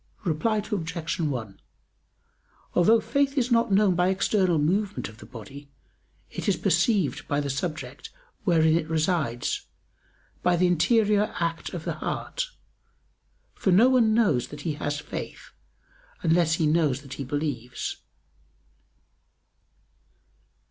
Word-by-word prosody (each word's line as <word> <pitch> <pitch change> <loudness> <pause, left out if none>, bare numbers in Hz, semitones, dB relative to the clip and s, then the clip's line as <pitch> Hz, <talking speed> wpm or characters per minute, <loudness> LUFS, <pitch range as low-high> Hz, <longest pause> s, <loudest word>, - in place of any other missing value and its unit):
Reply 185 +6 0
Obj. 165 -4 -3
1: 125 -11 -3 1.1
Although 220 +6 +5
faith 275 +5 0
is 250 -1 +1
not 230 -2 +3
known 195 -1 +4
by 180 +1 +2
external 190 -2 +2
movement 190 +7 0
of 110 0 -15
the - - -12
body, 135 +5 -11 0.6
it - - -2
is - - +3
perceived 195 - +1
by 145 - 0
the 140 -1 -2
subject 140 -2 -5 0.3
wherein 160 -4 +4
it 165 -1 -1
resides, 155 -7 -1 0.7
by 180 - +3
the 180 +1 +3
interior 210 +4 +3
act 165 +1 -2
of 165 - -5
the - - -1
heart. - - -3 1.1
For - - -1
no 220 +8 +6
one 230 -4 +4
knows 155 - +2
that 145 0 -9
he 155 +1 -2
has 145 0 -3
faith - - -7 0.7
unless 165 -1 +3
he 165 - 0
knows 150 -4 +2
that 135 -2 -9
he 140 - -5
believes. 135 -3 -3
165 Hz, 130 wpm, -26 LUFS, 145-205 Hz, 1.1 s, no